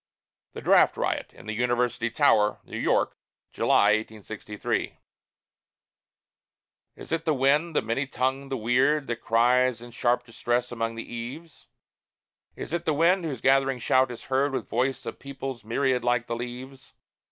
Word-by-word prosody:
THE - - -7
DRAFT - - +5
RIOT - - -2
IN - - -15
THE 110 - -4
UNIVERSITY 120 0 0
TOWER: 105 -2 +3
NEW - - -7
YORK, - - +1 0.4
July, 105 +1 +4
1863 110 -1 -4 2.0
Is - - -11
it 165 0 0
the 155 -2 +2
wind, 145 +5 +2
the - - +2
many 115 +5 -1
tongued, 135 +1 -2
the 135 - -1
weird, 130 +6 +2
That 120 -2 -3
cries 120 +1 +2
in 120 0 -11
sharp 120 +1 0
distress 120 +1 -2
about 115 -1 -3
the 115 - -5
eaves? 125 +8 -8 0.9
Is - - -7
it 170 0 -2
the 155 - +1
wind 170 +3 +3
whose 135 -7 -4
gathering 135 0 +3
shout 130 +2 +2
is 120 - -8
heard 135 +1 0
With - - -3
voice 130 +2 -1
of - - -6
peoples 135 -3 -6
myriad 125 +2 0
like 120 -1 +1
the 115 - -3
leaves? 125 +3 -8
125 Hz, 155 wpm, -26 LUFS, 115-135 Hz, 2.0 s, DRAFT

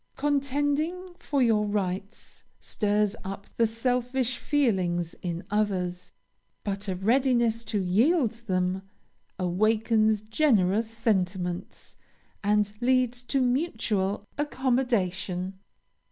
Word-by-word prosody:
Contending 290 +5 0
for 280 -3 +1
your 220 -3 +3
rights 200 +1 -3 0.2
stirs 210 0 0
up 195 +1 -6
the 230 - +4
selfish 250 +2 0
feelings 185 - +1
in 175 -1 -3
others; 185 -4 -1 0.5
but 200 0 -3
a 190 - -1
readiness 235 +2 +2
to 215 -3 -2
yield 230 - +3
them 190 -5 -1 0.6
awakens 215 +3 +2
generous 220 -4 +2
sentiments, 190 -6 -2 0.5
and 210 0 +2
leads 250 -1 +2
to 270 +2 -1
mutual 220 - 0
accommodation. 205 -10 0
220 Hz, 95 wpm, -27 LUFS, 190-250 Hz, 0.6 s, the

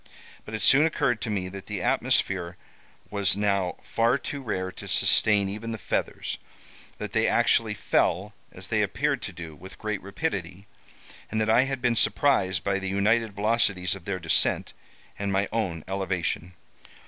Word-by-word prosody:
But 110 - -6
it 110 - -3
soon 145 +4 +6
occurred 120 -7 0
to - - -3
me 95 -3 -1
that 100 0 -9
the 100 -4 -3
atmosphere 90 -2 +1 0.5
was 100 -2 +1
now 100 -3 +1
far 115 +3 +2
too 140 +1 -5
rare 95 -6 -3
to - - -10
sustain 105 -2 +3
even 110 +4 -5
the - - -4
feathers; - - -2 0.6
that - - -5
they - - +2
actually - - +3
fell, - - +1 0.2
as - - -8
they - - +2
appeared - - 0
to - - -5
do, 80 -3 -9
with 95 +6 -12
great 105 -2 -3
rapidity; 100 - -4 0.6
and 110 - -1
that 110 0 +2
I 120 +4 +5
had 135 -2 -4
been 120 -1 +3
surprised 105 -8 +3
by 100 -1 0
the 95 0 -3
united 105 +3 +2
velocities 100 -3 +1
of 95 -3 -9
their 100 -2 -2
descent 85 -2 +1 0.5
and 100 -1 -1
my 95 +1 +1
own 95 -8 -2
elevation. 95 -2 -2
100 Hz, 170 wpm, -26 LUFS, 95-110 Hz, 0.6 s, soon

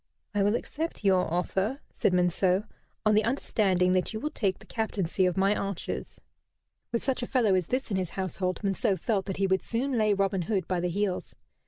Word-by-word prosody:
"I 205 - +1
will 205 +3 +3
accept 320 +1 -4
your 185 -4 +3
offer," 190 +8 0
said - - +2
Monceux, 180 +2 +3 0.4
"on 215 - +5
the 215 +1 +4
understanding 195 -6 +2
that 185 +2 +1
you 220 - -3
will 300 +6 -3
take 195 - 0
the - - -15
captaincy 195 -4 0
of 180 - -1
my 195 +2 +3
archers." 200 -3 -4 0.7
With 235 - -1
such 265 -2 0
a 245 - -3
fellow 235 -7 +3
as 185 -3 +1
this 255 -2 -2
in 195 - +1
his 185 -3 -1
household 185 -1 -2
Monceux 195 0 +1
felt 200 +1 0
that 190 - -3
he 195 - +2
would 190 0 +2
soon 250 +4 -2
lay 215 -1 +3
Robin 195 -1 +1
Hood 190 +2 -1
by 180 -2 0
the 180 +1 0
heels. 195 +1 -2
195 Hz, 205 wpm, -28 LUFS, 185-215 Hz, 0.7 s, on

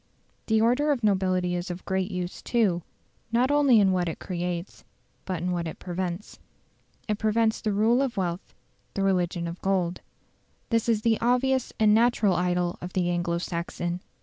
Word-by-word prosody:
The 220 -1 +3
order 250 +7 +3
of 255 -5 -1
nobility 185 -3 +1
is 175 +2 -3
of 175 +1 -6
great 190 0 -1
use, 180 -2 -4
too, 205 -8 +1 0.5
not 245 +4 +2
only 280 -6 +5
in 195 -2 +4
what 180 -2 +1
it 160 - -5
creates, 175 0 -4 0.4
but 180 -3 -3
in 180 - 0
what 170 -1 -2
it 160 - -6
prevents. 180 +1 -5 0.7
It 210 -1 -1
prevents 220 +1 +1
the 215 - 0
rule 220 +5 +3
of 265 -5 -2
wealth 180 -1 -3 0.4
the 195 - 0
religion 180 -3 0
of 170 +1 -7
gold. 185 -3 0 0.7
This 230 0 +1
is 215 -2 +1
the 225 -1 +2
obvious 250 +2 +2
and 215 -1 +5
natural 225 -3 +3
idol 180 0 0
of 180 +1 -7
the 175 -1 +1
Anglo 175 -1 0
Saxon. 175 0 -3
190 Hz, 175 wpm, -26 LUFS, 175-225 Hz, 0.7 s, only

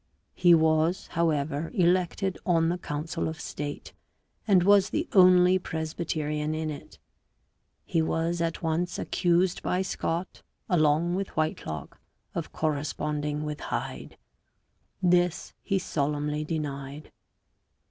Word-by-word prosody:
He 175 -1 +6
was, 160 +2 +2
however, 155 -2 0
elected 185 +1 +1
on 165 -2 +2
the 175 +1 -1
council 160 +2 -3
of 160 0 -5
state, 145 -2 -6 0.5
and 190 -4 +5
was 200 +1 +5
the 315 +8 -1
only 185 -1 +6
Presbyterian 155 -2 -3
in 155 0 -2
it; 145 - -10 0.9
he 165 - +1
was 165 +2 -1
at 165 0 -2
once 165 +2 -1
accused 175 +1 +1
by 185 +1 0
Scot, 175 -1 -3 0.3
along 160 0 +2
with 190 -2 -4
Whitelocke, 80 - -3 0.3
of - - -4
corresponding 150 0 -2
with 150 -1 -4
Hyde. - - -5 0.9
This 175 -1 +2
he 195 - 0
solemnly 150 -2 -1
denied. 145 -2 -5
165 Hz, 115 wpm, -27 LUFS, 150-180 Hz, 0.9 s, He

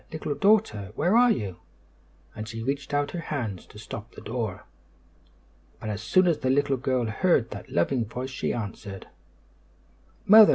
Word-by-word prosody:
Little 155 -2 -3
Daughter! 145 - +2
Where 175 - +2
are 245 +1 +7
you?" 100 - -1 0.8
and 110 -1 -6
she 115 0 -5
reached 140 +3 -2
out 145 0 0
her 175 - -4
hands 120 - -4
to - - -14
stop 115 +1 -8
the - - -9
door. 110 -4 -4 1.1
But 110 - -4
as 105 0 -4
soon 185 - +4
as 170 -4 +2
the 130 - 0
little 140 0 +2
girl 130 -1 0
heard 120 +2 +2
that 100 - -8
loving 115 +8 +1
voice 125 +4 -5
she 130 - -2
answered: 100 -3 -6 1.2
"Mother! 215 +1 +9
125 Hz, 165 wpm, -27 LUFS, 110-150 Hz, 1.2 s, Mother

